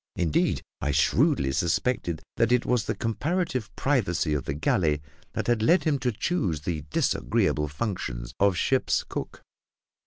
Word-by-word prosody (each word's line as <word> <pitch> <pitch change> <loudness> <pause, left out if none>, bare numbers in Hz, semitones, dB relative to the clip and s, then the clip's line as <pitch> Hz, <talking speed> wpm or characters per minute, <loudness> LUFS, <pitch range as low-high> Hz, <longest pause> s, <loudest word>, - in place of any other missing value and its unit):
Indeed, 80 -4 +1 0.2
I 70 - -1
shrewdly 75 -2 +3
suspected 85 - 0
that 115 0 +3
it 125 -1 +3
was 120 -4 +1
the - - -2
comparative 135 - -1
privacy 90 - +1
of 75 - -2
the 70 - -2
galley 75 0 +1 0.3
that - - -2
had 120 -2 +1
led 170 +11 +4
him 150 -4 +1
to 125 -1 0
choose 105 - -1
the 80 0 -3
disagreeable 75 0 +1
functions 70 - -4
of 100 -3 +3
ship's 130 +7 +1
cook. - - -6
95 Hz, 150 wpm, -26 LUFS, 75-125 Hz, 0.3 s, led